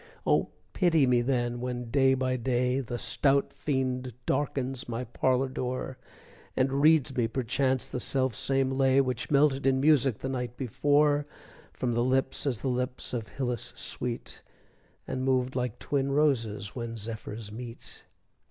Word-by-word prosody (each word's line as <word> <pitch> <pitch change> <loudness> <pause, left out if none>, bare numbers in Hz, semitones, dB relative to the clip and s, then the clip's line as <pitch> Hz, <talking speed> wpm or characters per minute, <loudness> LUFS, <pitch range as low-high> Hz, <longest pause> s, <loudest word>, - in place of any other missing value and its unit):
Oh, - - +2 0.2
pity 165 -6 +3
me 125 -1 +3
then, 120 -1 0
when, 125 -2 -4
day 135 0 +4
by 130 -1 0
day, 125 +1 0
The 120 -2 -4
stout 140 +3 +1
fiend 130 -3 -2
darkens 135 -3 -1
my 120 +1 -3
parlor 130 +2 +1
door; 130 0 -4 0.6
And 135 +2 +2
reads 150 -4 +4
me 120 -3 +2
perchance 130 +2 0
the - - -4
self 130 -1 +1
same 135 +3 0
lay 135 0 +3
Which 125 -3 -1
melted 140 -1 +3
in 130 0 +3
music, 140 -5 +4
the - - -5
night 125 -2 -4
before, 145 +3 +2 0.4
From 125 -2 -2
lips 130 +4 +1
as 120 -5 -1
the - - -2
lips 125 0 -2
of 115 -3 -3
Hylas 125 -3 -3
sweet, 120 -1 -3 0.7
And 130 - -3
moved 130 -1 +1
like 125 -3 -2
twin 140 -1 -1
roses 115 -8 +1
which 115 -2 -5
zephyrs 110 -1 -6
meet! 115 +1 -8
130 Hz, 150 wpm, -28 LUFS, 120-135 Hz, 0.7 s, day